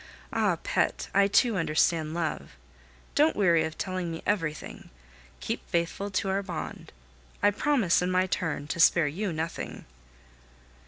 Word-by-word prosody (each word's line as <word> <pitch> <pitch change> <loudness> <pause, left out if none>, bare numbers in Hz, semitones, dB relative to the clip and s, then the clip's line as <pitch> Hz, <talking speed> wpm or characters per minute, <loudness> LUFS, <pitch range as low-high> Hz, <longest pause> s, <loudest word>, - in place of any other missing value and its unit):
Ah! - - +2
pet, - - 0
I 195 0 +5
too 215 +2 +3
understand 160 -1 +1
love. 165 -3 -3 0.6
Don't 305 +2 +3
weary 170 -5 +4
of 160 0 -6
telling 185 -2 -3
me 165 - -6
everything. 165 -7 -3 0.5
Keep - - -4
faithful 170 +4 -1
to 195 0 -1
our 195 +1 +1
bond. 175 -5 -6 0.5
I 205 - +6
promise, 230 -6 +2
in 180 - 0
my 185 0 +2
turn, 165 -6 -2
to 170 - -3
spare 170 -1 +5
you 185 +7 -2
nothing. 160 +1 -5
180 Hz, 145 wpm, -28 LUFS, 165-200 Hz, 0.6 s, I